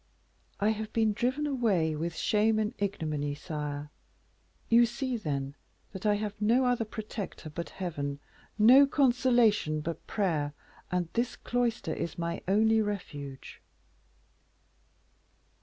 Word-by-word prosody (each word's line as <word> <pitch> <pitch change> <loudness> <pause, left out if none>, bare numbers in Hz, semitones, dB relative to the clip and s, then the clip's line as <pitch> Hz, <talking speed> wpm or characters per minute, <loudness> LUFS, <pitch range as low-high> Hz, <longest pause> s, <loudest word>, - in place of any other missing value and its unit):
"I 205 - +3
have 215 0 -2
been 220 -2 +2
driven 255 +7 0
away 210 - +1
with 165 +2 -3
shame 215 +4 +2
and 215 +1 0
ignominy, 155 -8 -2
sire. 150 -2 -5 0.8
You 235 +1 +6
see, 255 +2 -3
then, 140 -9 -3 0.4
that 195 +2 -4
I 210 - +4
have 210 0 -3
no 235 +5 +3
other 245 -2 +1
protector 210 -6 -6
but 170 +2 -5
Heaven, 145 -6 -4 0.4
no 255 +6 +8
consolation 240 - +3
but 165 +2 -5
prayer, 155 -8 0 0.4
and 180 -1 0
this 235 +1 0
cloister 240 -9 -1
is 170 - -4
my 170 0 -3
only 220 +3 +4
refuge." 145 -10 -6
205 Hz, 125 wpm, -29 LUFS, 160-230 Hz, 0.8 s, no